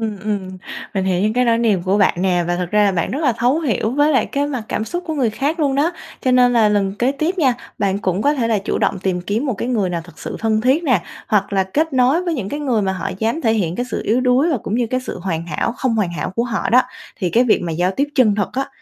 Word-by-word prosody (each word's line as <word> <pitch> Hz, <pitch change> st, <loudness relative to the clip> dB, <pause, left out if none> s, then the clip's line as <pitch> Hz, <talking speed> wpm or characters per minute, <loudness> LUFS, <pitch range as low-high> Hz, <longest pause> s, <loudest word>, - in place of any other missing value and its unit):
ừm, 215 Hz, -2 st, -3 dB
ừm, 200 Hz, -2 st, -3 dB, 0.4 s
mình 190 Hz, -1 st, 0 dB
hiểu 185 Hz, -2 st, +1 dB
những 215 Hz, -, +1 dB
cái 250 Hz, +2 st, +2 dB
nỗi 230 Hz, -1 st, +3 dB
niềm 215 Hz, -6 st, +2 dB
của 190 Hz, +3 st, +1 dB
bạn 200 Hz, -, +4 dB
nè, 180 Hz, -2 st, +2 dB
và 175 Hz, 0 st, 0 dB
thực 175 Hz, -1 st, -3 dB
ra 210 Hz, 0 st, +4 dB
là 200 Hz, -, +3 dB
bạn 170 Hz, -2 st, -1 dB
rất 270 Hz, -, -2 dB
là 265 Hz, -, +3 dB
thấu 250 Hz, +7 st, +1 dB
hiểu 230 Hz, -6 st, 0 dB
với 290 Hz, +4 st, +2 dB
lại 260 Hz, -, +2 dB
cái 285 Hz, +1 st, -1 dB
mặt 260 Hz, -6 st, -3 dB
cảm 220 Hz, -, -2 dB
xúc 350 Hz, +9 st, -4 dB
của 320 Hz, -, -2 dB
người 255 Hz, -6 st, +1 dB
khác 295 Hz, +9 st, -2 dB
luôn 275 Hz, -2 st, +1 dB
đó. 305 Hz, +5 st, +1 dB, 0.3 s
Cho 260 Hz, -, +1 dB
nên 250 Hz, -1 st, +5 dB
là 225 Hz, -3 st, +4 dB
lần 200 Hz, -2 st, +1 dB
kế 255 Hz, +3 st, +2 dB
tiếp 320 Hz, +6 st, -2 dB
nha, 265 Hz, -7 st, +3 dB, 0.2 s
bạn 200 Hz, -1 st, 0 dB
cũng 190 Hz, 0 st, -1 dB
có 290 Hz, +1 st, +3 dB
thể 235 Hz, -5 st, 0 dB
là 220 Hz, -, +2 dB
chủ 195 Hz, -, -2 dB
động 195 Hz, -, 0 dB
tìm 185 Hz, -1 st, -1 dB
kiếm 210 Hz, +9 st, -2 dB
một 255 Hz, -, 0 dB
cái 220 Hz, +4 st, -4 dB
người 210 Hz, -7 st, 0 dB
nào 170 Hz, -1 st, -2 dB
thực 175 Hz, -, -16 dB
sự -, -, -6 dB
thân 220 Hz, -1 st, +1 dB
thiết 265 Hz, +7 st, +2 dB
nè, 255 Hz, -5 st, +2 dB, 0.3 s
hoặc 200 Hz, -2 st, +1 dB
là 195 Hz, -1 st, +3 dB
kết 305 Hz, +12 st, -1 dB
nối 260 Hz, +7 st, +3 dB
với 345 Hz, -, -1 dB
những 210 Hz, -9 st, -3 dB
cái 290 Hz, -, -4 dB
người 245 Hz, -7 st, +1 dB
mà 190 Hz, -1 st, 0 dB
họ 190 Hz, +1 st, -3 dB
dám 225 Hz, +9 st, -1 dB
thể 225 Hz, -6 st, +2 dB
hiện 180 Hz, -6 st, -1 dB
cái 245 Hz, -, -2 dB
sự -, -, -2 dB
yếu 230 Hz, +4 st, +2 dB
đuối 255 Hz, +6 st, +3 dB
và 280 Hz, -, +1 dB
cũng 210 Hz, -, -4 dB
như 240 Hz, -1 st, +1 dB
cái 255 Hz, +2 st, -1 dB
sự 255 Hz, -, -6 dB
hoàn 170 Hz, -2 st, -3 dB
hảo 170 Hz, +8 st, -2 dB
không 260 Hz, -4 st, 0 dB
hoàn 200 Hz, -6 st, 0 dB
hảo 155 Hz, +2 st, -3 dB
của 230 Hz, +5 st, -1 dB
họ 235 Hz, -2 st, -2 dB
đó. 255 Hz, +2 st, +6 dB, 0.3 s
Thì 185 Hz, -5 st, -2 dB
cái 240 Hz, +6 st, +4 dB
việc 230 Hz, -, +2 dB
mà 170 Hz, -2 st, -3 dB
giao 175 Hz, +3 st, +1 dB
tiếp 285 Hz, +1 st, +1 dB
chân 230 Hz, -6 st, +4 dB
thực 205 Hz, -2 st, -1 dB
á, 270 Hz, +1 st, -2 dB
225 Hz, 305 wpm, -19 LUFS, 195-260 Hz, 0.4 s, đó